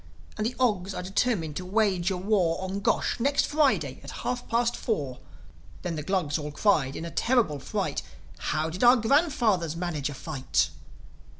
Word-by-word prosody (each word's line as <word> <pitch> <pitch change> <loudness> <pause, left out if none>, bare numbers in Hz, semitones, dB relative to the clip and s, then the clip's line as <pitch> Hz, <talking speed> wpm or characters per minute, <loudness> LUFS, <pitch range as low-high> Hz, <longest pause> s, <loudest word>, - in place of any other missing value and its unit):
And 215 0 -1
the 245 - -4
Ogs 200 -6 +1
are - - -4
determined 190 -5 0
to 185 - -4
wage 190 -2 +1
a 190 - -1
war 185 -3 +1
On 190 +1 -3
Gosh, 200 - 0
next 280 +4 +2
Friday, 295 -2 +1
at - - -8 0.2
half 245 0 -2
past 235 +1 +1
four." 140 - -2 0.6
Then 175 -2 -2
the 155 - -3
Glugs 160 -3 0
all 150 0 -4
cried, 145 -4 +2
in 165 - -5
a 170 - -6
terrible 230 - +2
fright, - - -2 0.4
"How 155 - -1
did 180 +7 -3
our 245 +1 +8
grandfathers 230 - +2
manage 165 -5 -2
a 145 - -7
fight?" 135 -3 -1
190 Hz, 175 wpm, -27 LUFS, 160-230 Hz, 0.6 s, our